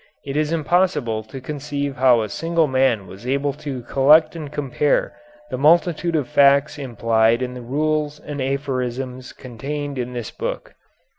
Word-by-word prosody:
It 135 0 -5
is 155 +1 0
impossible 155 -8 +1
to 130 +5 -9
conceive 145 0 -4
how 125 -3 +4
a - - -3
single 165 +7 0
man 130 -7 +1
was 95 +6 -11
able 140 +2 0
to 140 -3 -6
collect 150 +6 +4
and 155 -4 -7
compare 145 0 0 0.4
the - - -3
multitude 170 +2 +3
of 150 -5 0
facts 140 0 +4
implied 115 -2 +1
in 125 0 -4
the 125 - -8
rules 150 +3 -1
and 145 -2 -6
aphorisms 130 -2 -3
contained 140 +3 -6
in 125 0 -4
this 120 -3 -5
book." - - -5
140 Hz, 155 wpm, -21 LUFS, 125-150 Hz, 0.4 s, how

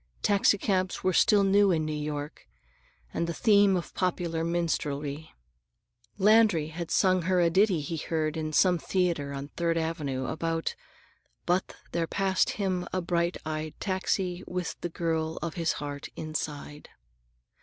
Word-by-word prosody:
Taxicabs 195 -2 +2
were 185 - +2
still 205 +3 +5
new 200 +1 +4
in 160 -4 +1
New 155 - -2
York, 150 - -5 0.7
and 170 - -1
the 170 - -3
theme 205 -3 +4
of 175 - -6
popular 170 -3 -1
minstrelsy. 155 -3 -2 0.9
Landry 205 -6 +4
had 165 +1 -6
sung 185 -1 +3
her 185 -1 +3
a 170 -1 +3
ditty 190 -2 +3
he 160 +3 -4
heard 155 0 -1
in 155 -1 -3
some 180 +2 +4
theater 170 -6 0
on 140 +1 -6
Third 170 0 -1
Avenue, 150 -5 -2
about: 165 +2 -2 0.7
"But 180 +2 0 0.2
there 170 -1 -1
passed 190 0 +1
him 185 -3 -1
a 185 - 0
bright 170 0 0
eyed 155 0 -4
taxi 185 -1 -1
With 180 -1 -3
the 175 - -3
girl 160 -1 -2
of 170 -2 -3
his 165 -2 0
heart 145 -1 -6
inside." 150 -1 -5
170 Hz, 145 wpm, -28 LUFS, 155-185 Hz, 0.9 s, still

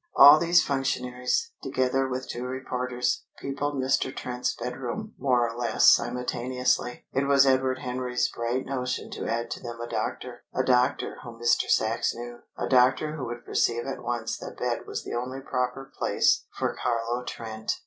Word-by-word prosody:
All 145 +2 +10
these 170 +1 +4
functionaries, 130 - -1
together 130 +1 +1
with 130 0 -4
two 120 - -5
reporters, 125 -1 -2
peopled 145 +1 -3
Mr. 130 0 +1
Trent's 125 -1 -3
bedroom 135 - -5
more 125 -3 +3
or 115 - -6
less 120 -2 +5
simultaneously. 125 0 0
It 135 +1 +1
was 140 0 +6
Edward 130 -1 +2
Henry's 125 -1 -1
bright 120 +2 -2
notion 125 -2 -3
to - - -4
add 115 +1 -2
to - - -3
them 120 -2 -7
a 120 - -4
doctor - - -4
a - - +2
doctor 125 -1 +2
whom 115 -2 -10
Mr. 120 0 +2
Sachs 110 +1 +2
knew, 120 0 -7 0.2
a - - -2
doctor 130 +4 +3
who 135 -5 -4
would 120 0 -6
perceive 120 0 +1
at 135 - -4
once 120 -1 -3
that - - -8
bed - - -2
was - - -4
the - - -6
only 125 +2 -3
proper 135 +1 -3
place - - +2
for - - -1
Carlo 120 +1 -1
Trent. 110 -2 -4
125 Hz, 170 wpm, -27 LUFS, 120-130 Hz, 0.2 s, All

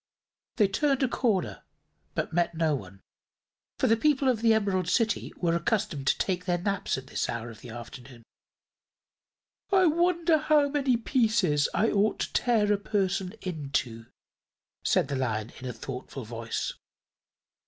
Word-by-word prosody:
They 210 -4 +4
turned 275 +7 +1
a - - +4
corner, 220 -7 0 0.5
but - - -2
met 170 0 +1
no 160 -2 +1
one, 100 -7 -6 0.8
for - - +1
the 225 - +5
people 275 +2 +2
of 235 -4 0
the 230 -1 +4
Emerald 200 -5 +1
City 225 -3 +1
were 170 -2 +1
accustomed 170 - -1
to - - +3
take 180 -1 -1
their 175 -1 +1
naps 195 -2 -1
at 130 - -7
this - - -3
hour 115 0 -4
of 110 - -14
the 125 - -10
afternoon. 120 +1 -10 1.5
"I 380 -1 +5
wonder 340 0 +3
how 295 -1 +3
many 275 -4 +1
pieces 220 - +2
I 225 - +2
ought 205 +1 +2
to - - -3
tear 215 -4 +3
a - - +1
person 195 -2 -1
into," 135 - -3 0.8
said - - +2
the 140 - -3
Lion, 110 -4 -2
in 130 - -6
a - - -3
thoughtful 125 +2 -7
voice. 115 0 -4
185 Hz, 155 wpm, -28 LUFS, -, 1.5 s, the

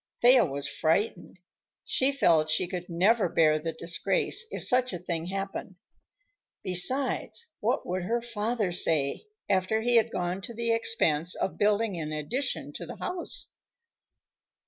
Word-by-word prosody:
Thea 245 0 +7
was 140 -2 -3
frightened. 175 +6 -1 0.5
She 265 +1 +2
felt 165 - +3
she 155 +3 +2
could 180 0 -6
never 190 +4 +2
bear 155 -2 +3
the 165 +1 -3
disgrace, 170 - +1
if - - -5
such 250 -3 +2
a - - -3
thing 170 -1 -4
happened. 195 0 -5 0.9
Besides, 255 - +1
what - - -1
would 185 +1 -2
her 235 +5 0
father 230 -3 -2
say, 160 - +1 0.2
after 190 +4 +1
he 240 +1 +3
had 230 0 +3
gone 180 +1 -3
to 235 +4 -8
the 230 0 -1
expense 185 -8 +2
of 190 - -3
building 205 -2 +1
an 155 -1 -4
addition 220 - -3
to - - -8
the - - -7
house? 360 -1 -5
190 Hz, 145 wpm, -28 LUFS, 170-230 Hz, 0.9 s, Thea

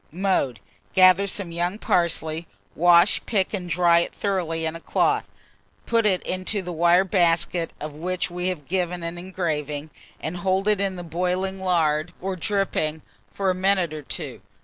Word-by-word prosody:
Mode. 175 - 0 0.4
Gather 185 +1 +6
some 190 -2 -3
young 175 +4 -1
parsley; 170 -4 0 0.3
wash, 175 +3 +5
pick, 200 -4 0
and 180 -3 -3
dry 170 0 +4
it 170 - -3
thoroughly 170 -5 -1
in 160 0 -2
a - - -6
cloth; - - 0 0.6
put 230 -2 +2
it 185 -3 +1
into 185 +2 -2
the 180 - -5
wire 175 +2 +4
basket 170 -2 +1
of 150 0 -6
which 180 +3 -3
we 180 +1 -3
have 165 -7 -4
given 180 -1 -1
an 170 +1 -4
engraving, 155 -5 -3 0.3
and 165 +3 -4
hold 190 +2 0
it 210 -2 +3
in 195 -1 0
boiling 185 +3 -1
lard 165 -2 +1
or 190 +1 -3
dripping 180 -5 -1 0.3
for 195 -1 0
a - - 0
minute 185 -3 +1
or 155 - -5
two. 135 - -6
180 Hz, 165 wpm, -24 LUFS, 165-190 Hz, 0.6 s, Gather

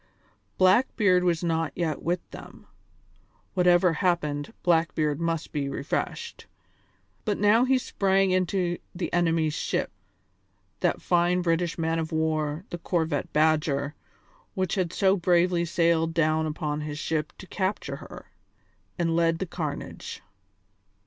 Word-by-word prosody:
Blackbeard 185 -1 +4
was 175 -1 +1
not 165 -1 0
yet 160 -4 -2
with 175 +1 -2
them - - -11 0.9
whatever 180 -1 +4
happened, 155 -2 -1
Blackbeard 160 -3 +1
must 165 -1 -2
be 140 -2 -2
refreshed 155 - -4 0.8
but 210 -3 -1
now 210 +4 +4
he 260 0 +3
sprang 195 -5 +1
into 185 -1 0 0.2
the 175 0 -4
enemy's 165 -3 +2
ship - - -2 0.9
that - - 0
fine 175 +1 +2
British 170 0 0
man 165 0 0
of 160 +1 -3
war, 160 +1 -1
the 175 - -4
corvette 160 -4 -1
Badger, 150 -2 +1 0.6
which 185 -3 -1
had 185 -4 0
so 195 -1 +3
bravely 175 -1 +2
sailed 165 -1 +1
down 155 -1 +2
upon 150 -1 -3
his 150 -1 -5
ship 155 -1 -2
to - - -10
capture 190 +1 -3
her - - -12 0.7
and 165 -2 0
led 165 -1 +2
the 190 - -3
carnage. 155 -5 -6
170 Hz, 130 wpm, -26 LUFS, 155-180 Hz, 0.9 s, Blackbeard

